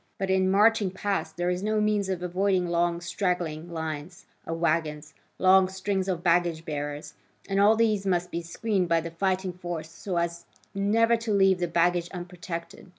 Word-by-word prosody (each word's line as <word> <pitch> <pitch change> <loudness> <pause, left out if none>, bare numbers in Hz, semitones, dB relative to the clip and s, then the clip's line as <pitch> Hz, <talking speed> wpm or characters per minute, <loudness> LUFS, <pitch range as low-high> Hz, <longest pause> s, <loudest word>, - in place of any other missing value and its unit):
But 190 0 -1
in 190 0 +3
marching 210 +1 +4
past 195 +1 -3
there 175 +1 0
is 180 0 -2
no 215 +1 0
means 210 -2 +1
of 180 -2 -2
avoiding 185 +1 +1
long 170 0 0
straggling 175 -3 -2
lines 160 +1 -5 0.2
of 165 - -3
waggons, 160 -2 -1 0.2
long 190 0 +5
strings 190 0 -2
of 175 -3 -2
baggage 170 -2 +2
bearers, 145 0 -5 0.3
and 195 0 0
all 210 +2 +6
these 215 -3 +2
must 180 -1 0
be 170 - -2
screened 185 +2 -1
by 165 0 +4
the 165 +1 -6
fighting 185 +1 -1
force 175 -3 -6
so 180 +1 -4
as 170 -2 -2 0.3
never 225 +4 +3
to 230 -1 -4
leave 195 -2 +4
the 175 - 0
baggage 175 +1 +1
unprotected. 175 -1 -7
180 Hz, 175 wpm, -27 LUFS, 170-195 Hz, 0.3 s, all